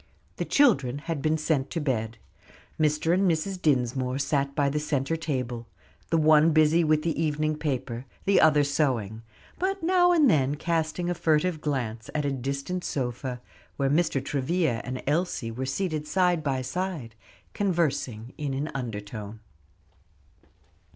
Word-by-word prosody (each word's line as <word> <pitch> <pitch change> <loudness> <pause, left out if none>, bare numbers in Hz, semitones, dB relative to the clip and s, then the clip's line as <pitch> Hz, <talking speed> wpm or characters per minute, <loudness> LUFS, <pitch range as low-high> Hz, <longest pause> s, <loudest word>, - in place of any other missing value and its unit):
The - - -2
children 140 - +3
had 155 0 -4
been 155 +1 +1
sent 150 -3 0
to 170 - -3
bed. 115 -6 -2 0.6
Mr. 155 +2 +2
and 190 +1 +3
Mrs. 180 +3 -1
Dinsmore 130 -3 +1
sat 140 0 0
by 145 -2 +2
the 145 +2 0
centre 150 0 -1
table, 125 -7 -3 0.4
the 165 - +2
one 155 0 +5
busy 155 +2 +4
with 155 -1 +2
the 165 -1 -1
evening 155 0 0
paper, 130 -5 -3 0.2
the 200 - +4
other 150 -2 +5
sewing, 125 -7 0 0.4
but 390 0 -1
now 355 +1 +4
and 320 -5 +5
then 140 - +3
casting 165 +2 -1
a 175 - +1
furtive 160 0 +1
glance 120 -7 -3
at 150 -1 0
a 140 - 0
distant 140 +7 -3
sofa, 125 -1 -3 0.4
where 135 -1 +1
Mr. 150 -4 +1
Travilla 140 -3 0
and 130 0 -5
Elsie 145 -6 -1
were 130 +3 -4
seated 155 0 -2
side 180 -2 +2
by 135 -3 -1
side, 160 -5 -4 0.4
conversing 140 - -1
in 140 -3 -2
an 145 +3 -3
undertone. 110 -3 -6
150 Hz, 150 wpm, -27 LUFS, 130-165 Hz, 0.6 s, one